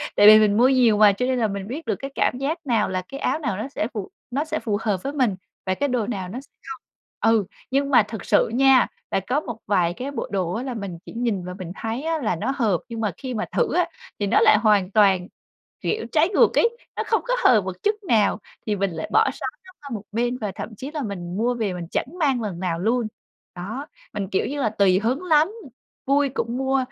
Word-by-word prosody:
Tại 205 - +7
vì 215 0 +10
mình 210 -1 +3
mua 245 +3 +6
nhiều 245 -5 +4
mà 210 -1 +7
cho 250 +6 -1
nên 255 -1 0
là 225 - +2
mình 200 -1 -5
biết 290 +8 -6
được - - 0
cái 275 0 -6
cảm - - +1
giác 280 +5 -1
nào 230 -4 +2
là 185 0 -1
cái 275 - -7
áo 310 - 0
nào 230 -11 -2
nó 220 +5 -3
sẽ 220 - -2
phù 210 -5 -5 0.2
nó 280 +5 -1
sẽ 315 0 -2
phù 210 -4 -1
hợp 200 -5 -1
với 280 - -3
mình 255 -9 +1 0.3
và 185 - +1
cái 285 +8 -1
đồ 245 -4 0
nào 195 -6 -4
nó 240 +7 -6
sẽ 280 - -21 0.2
không. 335 0 -7 0.5
Ừ, 215 -3 +2 0.3
nhưng 275 +1 +1
mà 250 -5 +6
thực 215 0 -8
sự - - +3
nha, 265 0 +5 0.2
là - - +2
có 265 +4 +2
một 240 -7 -6
vài 175 -4 +2
cái 260 +9 -5
bộ 280 - -4
đồ 185 -3 -1
á, 230 - -3
là 260 -1 -4
mình 200 -6 -5
chỉ - - -10
nhìn 230 -6 -1
và 180 - -5
mình 175 -2 -6
thấy 225 +5 -4
á 325 0 -1
là 220 -6 0
nó 210 +10 -2
hợp 210 -10 +1
nhưng 230 -1 -5
mà 210 -3 0
khi 260 -2 -5
mà 220 -2 -2
thử - - +1
á - - +3 0.3
thì 205 - 0
nó 220 - +4
lại - - +6
hoàn 210 -3 +3
toàn, 195 -4 +4 0.5
kiểu, 440 +1 -1
trái 320 +3 +3
ngược 395 - +3
ấy, 470 0 +2 0.2
nó - - -1
không 450 - +2
có - - 0
hợp 220 -4 +6
một 190 -1 -5
chút 420 +1 +2
nào 215 -2 +3 0.3
thì 210 - +1
mình 195 -1 -1
lại 160 -1 -5
bỏ - - +5
xó 270 - -7 0.2
nó 370 - -14
qua 285 - -9
một 205 - -6
bên 240 +3 0
và 210 -5 -3
thậm 220 - -7
chí 270 +6 -6
là 305 -1 -4
mình 180 -4 -5
mua 240 +3 +1
về 215 -5 -1
mình 175 -2 -6
chẳng - - 0
mang 275 -6 +2
lần 200 -6 -4
nào 175 -3 -2
luôn. 230 +4 +1 0.5
Đó, 220 +11 -6 0.3
mình, 205 -2 -3
kiểu 190 - +1
như 285 +1 -3
là, 225 - +2
tùy 195 -3 +3
hứng 250 - -1
lắm, 315 -1 +4 0.6
vui 280 +1 +3
cũng 245 -2 -3
mua, 265 0 +1
230 Hz, 260 wpm, -23 LUFS, 200-270 Hz, 0.6 s, vì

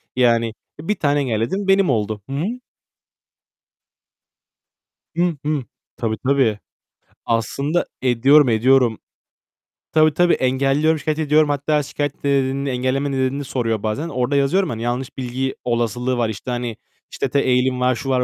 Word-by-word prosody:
yani 115 -2 +2 0.3
1 190 +8 -1
taneyi 145 -1 +1
ayarladım, 120 - -1
benim 195 -3 +4
oldu. 105 -3 -1
Hı 135 - -4
hı. 215 - -2 2.6
Hıh, 175 0 +1
hıh. 150 -3 0 0.3
Tabii, 110 -2 -2
tabii. 130 -7 +2 0.7
Aslında 140 +8 0 0.2
ediyorum, 130 +3 +5
ediyorum. 120 0 +3 1.0
Tabii, 155 -1 +4
tabii, 175 +2 +3
engelliyorum, 135 +4 +1
şikâyet 155 +1 -2
ediyorum. 155 0 +3
Hatta 145 +1 +1
şikâyet 145 0 -4
nedenini, 140 0 0
engelleme 130 +3 -1
nedenini 135 +1 -1
soruyor 115 -5 -2
bazen. 140 +10 -2
Orada 130 +1 -1
yazıyorum, 145 +8 +2
hani, 115 -1 -4
yanlış 125 +3 -3
bilgi 130 +1 -3
olasılığı 120 +1 -1
var. 120 -2 +1
İşte, 110 +4 -5
hani, 120 -2 -3 0.3
işte, - - -2
te 140 - +2
eğilim 125 -1 +1
var, 125 0 +2
şu 135 +4 -5
var 125 -1 +2
130 Hz, 140 wpm, -20 LUFS, 120-145 Hz, 2.6 s, ediyorum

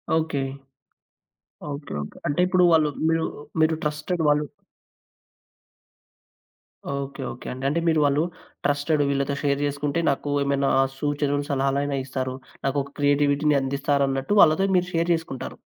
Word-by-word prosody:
Okay. 160 -3 0 1.3
Okay. 145 +1 -7
Okay. 75 - -9
అంటే 145 +5 0
ఇప్పుడు 185 -1 +3
వాళ్ళు 155 -2 +4 0.2
మీరు 165 0 +1 0.4
మీరు 160 0 +3
ట్రస్టెడ్ 150 +3 -2
వాళ్ళు 150 0 +3 2.5
ఓకే. 140 0 -4
ఓకే 120 - -11
అండి. 130 +1 -7
అంటే 150 +5 +1
మీరు 160 -1 +3
వాళ్ళు 145 +2 +2 0.4
ట్రస్టెడ్ 145 +1 +1
వీళ్ళతో 140 0 0
షేర్ 140 -1 +1
చేసుకుంటే 145 +2 -1
నాకు 140 +1 -1
ఏమైనా 140 0 +1 0.3
సూచనలు, 145 -1 0
సలహాలైన 140 +1 0
ఇస్తారు. 130 -1 -3 0.3
నాకొక 140 0 -1
క్రియేటివిటీ‌ని 145 +1 +3
అందిస్తారన్నట్టు 140 +3 0
వాళ్ళతో 170 +4 +5
మీరు 180 0 +1
షేర్ 170 +1 +1
చేసుకుంటారు. 160 -6 -5
145 Hz, 120 wpm, -24 LUFS, 140-155 Hz, 2.5 s, వాళ్ళతో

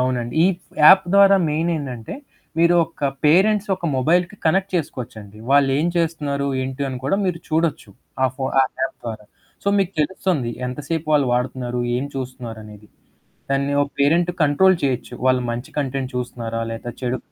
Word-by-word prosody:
అవునండి. 125 -2 -1
ఈ - - +6 0.4
యాప్ 190 +5 +8
ద్వారా 200 0 +7
మెయిన్ 160 +3 0
ఏంటంటే 125 -6 -6 0.4
మీరు 170 +1 +4
ఒక 160 -3 -7 0.2
పేరెంట్స్ 195 +7 +4
ఒక 185 - -11
మొబైల్‌కి 175 +8 +1
కనెక్ట్ 190 +4 +1
చేసుకోవచ్చండి. 110 -9 -6
వాళ్ళు 140 -1 +5
ఏం 160 - +1
చేస్తున్నారు 150 -4 -1 0.2
ఏంటి 130 +2 -4
అని 130 -1 -5
కూడా 140 +8 +1
మీరు 180 -3 -1
చూడొచ్చు. 160 -8 -1 0.3
ఆ - - +6
ఫో 135 - -3 0.2
ఆ - - +4 0.2
యాప్ 135 - -2
ద్వారా. 110 -2 -6 0.4
సో, - - 0
మీకు 195 -1 0
తెలుస్తుంది. 150 -5 -1 0.2
ఎంతసేపు 150 +5 -4
వాళ్ళు 145 -3 +4
వాడుతున్నారు? 125 0 -2 0.2
ఏం 130 - -2
చూస్తున్నారనేది? 115 -5 -8 0.6
దాన్ని 140 +1 0
ఒ - - +2
పేరెంట్ 165 +5 +3
కంట్రోల్ 175 +6 +4
చేయొచ్చు. 130 -3 -2
వాళ్ళు 130 -1 +3
మంచి 120 +2 -5
కంటెంట్ 135 -2 -2
చూస్తున్నారా 120 -2 -4
లేదా 115 +1 -6
చెడు 125 0 -1
140 Hz, 155 wpm, -21 LUFS, 125-165 Hz, 0.6 s, యాప్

